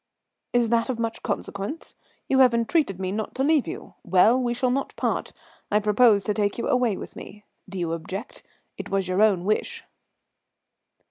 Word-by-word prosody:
"Is 240 -2 +2
that 230 +1 +1
of 255 - -1
much 230 -1 -3
consequence? 200 +11 -5 0.3
You 265 - +2
have 250 -3 +6
entreated 230 - +1
me 185 -1 -2
not 215 +2 -4
to 265 - 0
leave 300 -1 +3
you. - - -7
Well, 205 +7 +4
we 240 -1 0
shall 255 0 +1
not 275 +2 -2
part; - - -2 0.4
I 210 - +3
propose 210 0 +4
to 210 - 0
take 205 -1 -1
you 235 - -2
away 245 -6 +1
with - - -9
me. 210 +1 -11 0.2
Do 195 - -7
you 170 -2 -2
object? 190 +8 -6 0.4
It - - -6
was 195 -1 0
your 185 +2 +1
own 195 -5 +3
wish." 460 - -1
220 Hz, 185 wpm, -25 LUFS, 195-250 Hz, 0.4 s, have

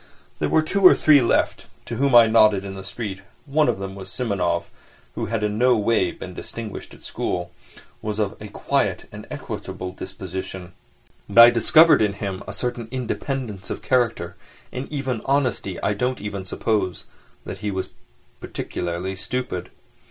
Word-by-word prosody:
There - - 0
were 160 - +3
two 200 +5 -1
or 185 - +9
three 150 -3 +6
left 120 - +1 0.2
to - - -5
whom 140 -1 +3
I 120 -1 +10
nodded 110 -3 +4
in 95 - -6
the 95 0 -8
street. 95 0 -5 0.2
One 150 +1 +2
of - - 0
them 95 0 -5
was 95 -1 -9
Simonov, 100 -8 0 0.5
who - - -3
had 110 0 -2
in 105 0 -1
no 125 -1 +5
way 105 -3 +2
been 90 +1 -8
distinguished 110 +3 -7
at - - -19
school, 90 -1 -3 0.5
was 105 -1 -3
of 105 -2 -1
a 105 - -6
quiet 100 - -1
and - - -10
equable 95 0 -6
disposition; 95 -1 -7 0.6
but 100 - -6
I 120 - +10
discovered 155 +7 +6
in 105 -2 +2
him 100 -1 -4
a - - -4
certain 120 -2 -3
independence 125 -4 -4
of - - -5
character 115 -9 0 0.4
and 130 +3 -6
even 130 -6 -2
honesty 125 -9 0
I 105 - +2
don't 125 +5 -1
even 100 -2 -5
suppose 95 -2 -1 0.4
that - - -6
he 105 0 -2
was 95 -1 -3 0.5
particularly 90 +2 -4
stupid. 100 -3 -4
105 Hz, 165 wpm, -23 LUFS, 95-125 Hz, 0.6 s, I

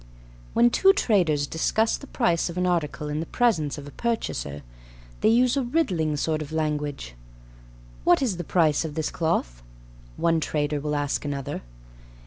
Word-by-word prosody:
When 240 +1 +5
two 390 +9 +5
traders 175 - +2
discuss 220 +9 +1
the 280 - -10
price 185 -12 +1
of 170 - -7
an 180 - +1
article 160 -4 -1
in 150 +1 -2
the 165 - -4
presence 175 - +1
of 145 -1 -8
a - - -9
purchaser, 180 - -3 0.6
they - - +3
use 245 +3 +4
a 275 - +1
riddling 195 - 0
sort 155 +1 -1
of 155 0 -7
language. 150 - -2 0.9
"What - - +5
is 235 -10 -1
the 175 - -4
price 160 -3 +2
of 155 -2 -5
this 160 -1 -2
cloth?" - - -1 0.6
one 165 -1 +2
trader 150 -1 -1
will 150 +1 -2
ask 145 -1 -1
another. 140 -2 -4
160 Hz, 165 wpm, -25 LUFS, 150-220 Hz, 0.9 s, When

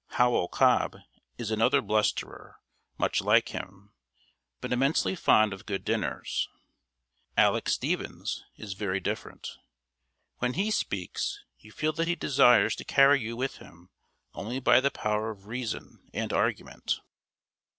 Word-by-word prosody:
Howell 120 -7 +3
Cobb - - +2 0.4
is 115 -2 -4
another 110 +1 +3
blusterer, 105 -1 -1 0.4
much - - +1
like - - +3
him, 100 +2 -8 0.7
but - - -3
immensely 135 +9 +2
fond 110 - +4
of 95 - -11
good 100 -2 -3
dinners. - - -1 0.9
Aleck - - +3
Stephens - - -2
is 100 -2 -7
very 95 -1 -2
different. 95 - -5 0.8
When 125 0 0
he 200 +5 0
speaks, 100 - -2 0.2
you 110 - -16
feel 155 +6 -1
that 165 +2 -1
he 175 - +1
desires 125 -6 +4
to - - -6
carry 140 0 +5
you 115 +1 -5
with 130 +2 -2
him 85 +2 -16 0.4
only 120 +6 -4
by 130 - +5
the 140 - +3
power 105 -3 -1
of 100 -3 -9
reason 120 +1 -6
and - - -2
argument. - - -1
110 Hz, 135 wpm, -28 LUFS, 100-135 Hz, 0.9 s, carry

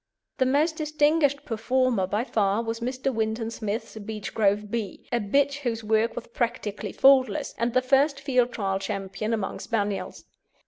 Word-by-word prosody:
The 260 - +3
most 305 +5 +2
distinguished 300 -1 +2
performer 235 -2 +1
by 210 +4 0
far 210 -3 +1
was 225 0 -3
Mr. 260 +2 -2
Winton 225 0 -1
Smith's 220 +1 -4
Beechgrove 210 -1 -1
Bee, 220 -5 -4
a 240 - +2
bitch 280 +7 +1
whose 230 -5 -3
work 220 +2 +1
was 240 - -5
practically 235 -3 -3
faultless, 270 +2 +4
and 235 +1 0
the 255 - +4
first 275 +2 +3
Field 255 -3 +1
Trial 195 -4 -1
Champion 195 +2 -4
among 215 -4 -2
Spaniels. 205 -5 -3
230 Hz, 150 wpm, -26 LUFS, 210-265 Hz, -, faultless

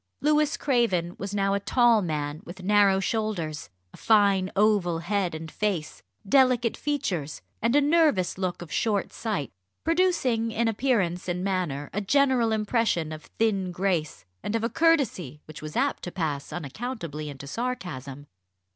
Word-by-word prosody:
Louis 300 0 +2
Craven 210 - +1
was 200 +1 -4
now 195 -1 +1
a 200 - +1
tall 235 +1 +4
man 150 -3 -3
with 180 +2 -10
narrow 200 -1 +4
shoulders, 195 - -2 0.2
a - - -13
fine 200 -3 +3
oval 200 -5 +3
head 180 0 -1
and 160 0 -7
face, 195 -8 -2 0.3
delicate 250 -1 +4
features, 200 - -3 0.2
and 230 +4 +2
a 290 - +6
nervous 295 - +3
look 180 -2 -2
of 160 - -13
short 210 -4 0
sight, 185 - -3 0.3
producing 325 -10 +1
in 225 +1 0
appearance 210 -7 0
and 180 +1 -2
manner 175 -8 -2
a 205 - -1
general 255 0 +3
impression 215 -7 0
of 155 0 -8
thin 200 -5 +1
grace 175 - -1 0.2
and 210 - -3
of 225 - 0
a 230 - +1
courtesy 245 - +1
which 155 - -10
was 155 0 -7
apt - - +1
to 175 - -6
pass 150 -6 -3
unaccountably 165 - -5
into 140 -1 -9
sarcasm. 145 - -5
195 Hz, 155 wpm, -26 LUFS, 170-230 Hz, 0.3 s, a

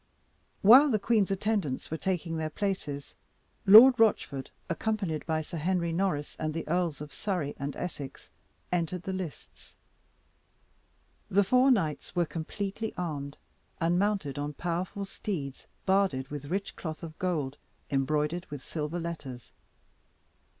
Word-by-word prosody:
While 260 +9 +9
the 220 - +3
queen's 210 -1 +2
attendants 195 -9 -1
were - - 0
taking 170 -2 -2
their 155 -1 -2
places, 155 -6 -3 0.5
Lord 235 +5 +10
Rochford, 150 -11 +2 0.2
accompanied 190 -4 -1
by 160 -1 +1
Sir 165 +1 -6
Henry 170 0 0
Norris 170 -5 -1
and 155 0 -2
the 165 - -4
Earls 170 -3 0
of 150 0 -8
Surrey 180 -9 -2
and 140 0 -3
Essex, 145 -6 -6 0.4
entered 175 0 -1
the 190 - -3
lists. 185 -5 -8 1.5
The 200 +2 +4
four 255 +7 +4
knights 165 - 0
were 175 -1 +3
completely 195 +7 -4
armed, 145 -5 -4 0.4
and 170 +1 +2
mounted 195 -9 0
on 145 +1 -3
powerful 175 +5 -3
steeds 155 -9 -5 0.2
barded 190 -9 +2
with 145 -1 -5
rich 195 +7 -3
cloth 160 -1 -6
of 160 -1 -8
gold, 155 -7 -1 0.3
embroidered 150 +5 0
with 145 -3 -7
silver 155 +2 -3
letters. 150 -8 -6
170 Hz, 135 wpm, -29 LUFS, 150-195 Hz, 1.5 s, Lord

